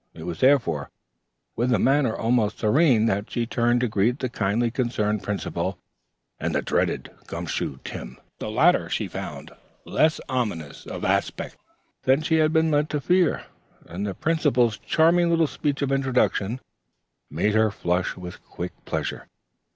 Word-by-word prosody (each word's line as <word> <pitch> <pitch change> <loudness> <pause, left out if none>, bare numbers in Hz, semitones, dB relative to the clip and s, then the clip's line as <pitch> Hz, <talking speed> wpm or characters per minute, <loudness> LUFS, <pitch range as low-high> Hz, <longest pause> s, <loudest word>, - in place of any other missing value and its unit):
It 80 - -9
was, 85 -1 -5
therefore, 115 - +3 0.7
with 120 +2 0
a 120 - +4
manner 135 +1 +2
almost 115 -2 +1
serene 120 0 +4
that 100 -1 0
she 120 - -1
turned 120 0 +1
to 125 - +2
greet 110 +4 +1
the 130 - -3
kindly 115 +2 0
concerned 105 -4 -1
Principal 105 -1 -3 0.6
and - - -2
the - - +1
dreaded - - -1 0.2
"Gum - - -5
Shoe 65 - -3
Tim." 60 +1 -7 0.2
The - - -4
latter 150 +11 +3
she - - -1
found - - -7 0.3
less 155 0 +2
ominous 105 - -3
of - - -5
aspect - - -1 0.5
than 135 +4 +2
she 160 0 +2
had 155 -1 +3
been 160 0 +3
led 150 0 +2
to 150 - -1
fear, 180 +2 +2 0.4
and 95 +5 -4
the 95 - -4
Principal's 125 -9 +1
charming 170 +2 +3
little 165 -1 +3
speech 145 +1 -2
of 135 - -1
introduction 130 -4 +1 0.7
made 100 +8 0
her 110 0 +4
flush 90 -2 -1
with 90 -1 -9
quick 90 +1 -6
pleasure. - - -3
120 Hz, 160 wpm, -24 LUFS, 105-145 Hz, 0.7 s, a